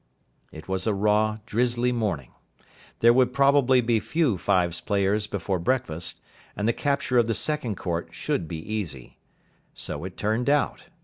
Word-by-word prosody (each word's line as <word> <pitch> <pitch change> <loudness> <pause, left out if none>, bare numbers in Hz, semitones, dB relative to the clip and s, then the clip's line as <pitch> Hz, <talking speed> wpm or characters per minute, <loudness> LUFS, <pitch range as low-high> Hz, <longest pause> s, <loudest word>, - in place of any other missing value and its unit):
It 80 - -11
was 95 +1 -2
a 105 - +2
raw, 105 +2 +2
drizzly 120 +1 +1
morning. 100 - -2 0.7
There 115 +1 +7
would 125 0 +3
probably 140 -2 +4
be 115 -1 +2
few 155 -3 +1
fives 90 -4 +1
players 105 +1 +1
before 95 -2 -2
breakfast, 85 -6 -2 0.3
and 105 - -1
the 115 - +3
capture 140 -3 +1
of 115 - +3
the 115 - 0
second 140 -10 -2
court 85 -1 -3
should 80 - -2
be 80 - -5
easy. 80 - -6 0.6
So 75 +1 -5
it 95 0 -7
turned 110 +5 0
out. 145 0 +1
110 Hz, 160 wpm, -25 LUFS, 95-125 Hz, 0.7 s, There